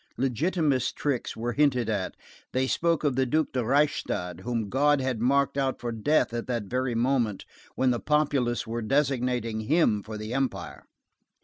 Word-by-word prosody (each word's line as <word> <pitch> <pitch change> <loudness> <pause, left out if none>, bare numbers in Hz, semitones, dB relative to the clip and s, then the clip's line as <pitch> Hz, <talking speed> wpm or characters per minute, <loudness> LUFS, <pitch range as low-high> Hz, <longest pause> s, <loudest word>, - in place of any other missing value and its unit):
Legitimist 135 - 0
tricks 140 -5 -2
were 120 +2 -2
hinted 135 -4 +2
at; 100 -4 -2 0.4
they 130 +1 +2
spoke 165 +4 +1
of 145 -4 +1
the 130 0 +1
Duc 155 +4 +1
de 125 -2 0
Reichstadt, 120 - 0
whom 115 +1 -2
God 145 +5 +3
had 130 -4 -2
marked 140 +2 +2
out 135 -1 0
for 120 -1 -3
death 115 +4 +1
at 120 -1 -3
that 120 -3 -1
very 125 +3 -2
moment 120 -4 0 0.3
when 130 -1 +2
the 120 - 0
populace 145 -5 +1
were 115 +1 -3
designating 125 -3 0
him 110 -3 +2
for 110 +1 -7
the 110 +2 -5
Empire. 95 - -3
125 Hz, 170 wpm, -27 LUFS, 115-140 Hz, 0.4 s, God